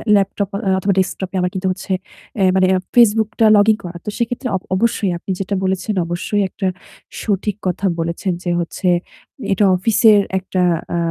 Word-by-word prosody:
Laptop 200 0 0 0.3
অথবা 195 +1 +1
ডেস্কটপে 190 0 -2
আমার 180 - 0
কিন্তু 190 0 -2
হচ্ছে 190 +1 -6 0.5
অ্যা 195 - +3
মানে 190 0 +4
এক 185 - -5
Facebook 220 -2 +5
টা 225 - +5
লগইন 210 +1 +4
করা। 175 -1 -7
তো - - -3
সেক্ষেত্রে 245 +2 -2
অব 185 - -2
অবশ্যই 205 -1 +1
আপনি 190 - -6
যেটা 195 +1 -2
বলেছেন, 190 +3 -1
অবশ্যই 175 +4 -1
একটা 190 - -3 0.5
সঠিক 205 -1 -1
কথা 190 +2 -2
বলেছেন, 170 +3 -2
যে 175 - -1
হচ্ছে 175 +2 -3 0.6
এটা 195 +2 +2
অফিসের 215 +2 +4 0.2
একটা 185 0 -2 0.3
আ - - 0
195 Hz, 170 wpm, -18 LUFS, 185-210 Hz, 0.6 s, Facebook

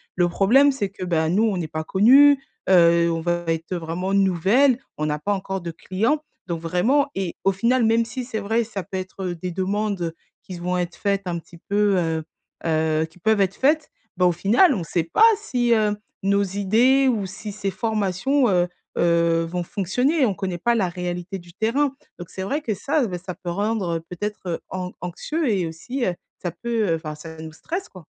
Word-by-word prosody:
Le 175 -1 +3
problème 260 +11 +5
c'est 200 -7 -2
que, 185 - -8
bah, 160 -2 +1
nous, 205 +6 +2
on 210 -4 +1
n'est 165 -3 -3
pas 155 0 -3
connues, 270 - +6 0.3
heu, 170 -2 +5
on 165 - -1
va 175 0 -1
être, 165 +2 -2
heu, - - -1
vraiment 175 +4 -3
nouvelles, 200 +8 +3 0.2
on 155 - -1
n'a 150 0 -1
pas 205 +7 0
encore 195 -1 -3
de 170 -1 -5
clients 225 - -1 0.3
donc 170 -2 -3
vraiment 240 - +2
et 190 -3 -3
au 195 - +4
final, 235 +4 +2
même 225 +1 +3
si 245 +2 -5
c'est 220 -3 -4
vrai, 225 +3 0
ça 200 -4 -5
peut 190 0 -6
être, 185 +1 -6
heu, 175 -1 -2
des 180 +2 -5
demandes, 190 -2 -1 0.3
qui 185 - -9
s 175 - -7
vont 180 +1 -1
être 175 -1 -3
faites 200 -1 0
un 170 -2 -2
petit 170 +1 -16
peu, 200 +2 +1
heu, 160 -2 0 0.4
heu, 160 -1 +1
qui 160 +2 -19
peuvent 220 +2 +2
être 195 0 +1
faites, 300 +3 +2 0.3
ben, 180 - +3
au 175 - +4
final 235 - +4
on 180 - -3
sait 165 0 -1
pas 430 - +3
si, 245 - -1
heu, 210 -2 +2 0.3
nos 200 +1 +2
idées 225 +8 +3
ou 220 -6 +1
si 195 +2 -7
ces 200 -1 -3
formations, 220 +5 +1
heu, 180 -1 +2 0.3
heu, 170 -1 +3
vont 175 +1 -3
fonctionner, 250 - +1
on 205 - +1
connaît 180 0 -3
pas 235 +6 +1
la 190 -6 +1
réalité 180 +2 -4
du 175 0 -16
terrain, 270 +7 0 0.2
donc 175 - -8
c'est 190 - -6
vrai 280 +10 -1
que 220 -6 -2
ça, 275 +5 0
bah, 180 -2 -4
ça 180 -2 -5
peut 175 - -7
rendre 195 -3 -1
peut-être 185 -2 -4
an 180 -1 -4
anxieux 300 - -3
et 190 -5 +1
aussi, 240 +12 -5
heu, 180 - 0 0.3
ça 175 - -1
peut, 220 +2 -1
heu, 165 - +3
enfin, 155 -1 -6
ça 160 +1 -10
nous 160 0 -8
stresse 350 - -5
quoi. 185 -5 -14
190 Hz, 215 wpm, -23 LUFS, 175-225 Hz, 0.4 s, connues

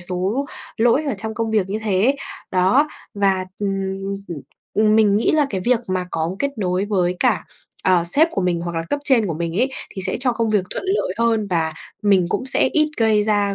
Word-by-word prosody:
số 185 +10 -1 0.3
lỗi 240 +6 +3
ở 280 -5 -1
trong 220 +1 -4
công 225 0 -2
việc 210 -4 +1
như 205 +2 -2
thế 200 -4 0
ấy, 270 +3 +3 0.3
đó. 190 +12 +3 0.3
Và, 195 -2 +1
ừm, 205 -1 -1 0.6
ừm, 165 -4 -6 0.3
ừm, 215 0 +3
mình 210 -2 +4
nghĩ 220 - +2
là 300 -2 +3
cái 190 - -2
việc 245 -2 +3
mà 185 -1 -1
có 165 +3 -2
kết 280 +5 0
nối 185 -1 0
với 180 -4 0
cả, - - +2 0.4
ờ, 180 -2 +4
sếp 290 - +5
của 195 - -2
mình 175 -2 0
hoặc 170 -1 -4
là 165 - -1
cấp 290 - 0
trên 250 -7 +4
của 165 - -2
mình 170 +1 -3
ấy, 255 +6 +2 0.2
thì 190 - -6
sẽ 185 0 +1
cho 250 -1 +2
công 230 -2 -1
việc 205 -3 +2
thuận - - -4
lợi 380 - 0
hơn. 225 -3 +1
Và 160 -2 0 0.3
mình 195 -4 +3
cũng 260 - -2
sẽ 260 - +3
ít 305 -1 +3
gây 220 -2 +3
ra 205 -2 +1
205 Hz, 225 wpm, -20 LUFS, 185-230 Hz, 0.6 s, sếp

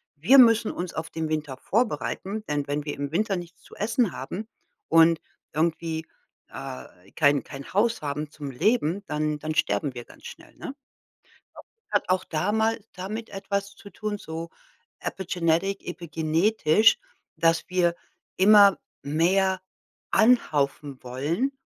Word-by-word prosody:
Wir 215 - +5
müssen 230 -2 +6
uns 175 0 -5
auf 160 +1 -4
den 160 -1 -3
Winter 150 -4 -3
vorbereiten, 215 - -1
denn 145 -1 -1
wenn 145 +1 -2
wir 145 - -3
im 140 0 -4
Winter 200 +3 +1
nichts 175 0 -9
zu - - -15
essen 225 0 +1
haben 185 +11 -6 0.4
und 165 0 +6 0.3
irgendwie, 160 0 -1 0.4
äh, 90 +9 -9
kein 145 -2 +3
kein 140 +2 -10
Haus 225 +1 +2
haben 145 +1 -3
zum 145 -3 -7
Leben, 200 - +1
dann 150 0 -1
dann 155 +1 -4
sterben 125 +5 0
wir 120 - -7
ganz - - -17
schnell, - - -13
ne? 275 - -7 0.6
Ich - - -35
glaube, - - -14 0.2
es - - -40
hat - - +1
auch 185 0 +1
damal 220 +7 0
damit 210 +5 -6
etwas 200 0 -3
zu 200 - -13
tun, 210 +1 -4
so 165 +1 -6 0.5
epigenetic, 185 +1 -1
epigenetisch, 170 +3 +2 0.4
dass 165 0 +2
wir 175 -2 +2 0.4
immer 200 -1 +7 0.3
mehr 185 +5 +2 0.5
anhäufen 145 - +2
wollen 150 - -1
170 Hz, 140 wpm, -26 LUFS, 150-205 Hz, 0.6 s, immer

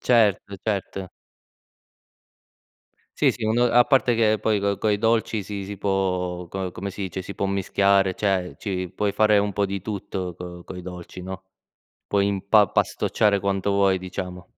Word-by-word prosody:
Certo, 105 -4 +2
certo. 95 -3 -3 2.1
Sì 145 - +5
sì, 115 -2 -5
un 110 +2 +1
a 120 0 +5
parte 130 -3 +3
che 110 -1 +3
poi, 105 -2 +1
co 100 -1 0
coi 105 -2 +1
dolci, 110 -1 +1
si 100 0 -5
si 100 0 -7
può 90 -3 -1
co 95 -1 -4
come 100 +3 -5
si 100 - -10
dice, 95 -1 -4
si 100 +2 -8
può 100 - -1
mischiare, 100 0 +2
cioè, 95 -3 -1
ci 95 -3 -3
puoi 105 -1 0
fare 105 -1 +4
un 100 -1 0
po' 100 - +1
di 100 0 -3
tutto 95 -3 -4
co 90 0 -9
coi 90 -1 -8
dolci, 90 0 -8
no, 95 +1 -7 0.6
puoi 100 -1 +2
impa 100 +1 +4
pastocciare 105 -2 +1
quanto 100 0 -1
vuoi, 100 -2 +3
diciamo. 90 -1 -6
100 Hz, 165 wpm, -24 LUFS, 95-105 Hz, 2.1 s, Sì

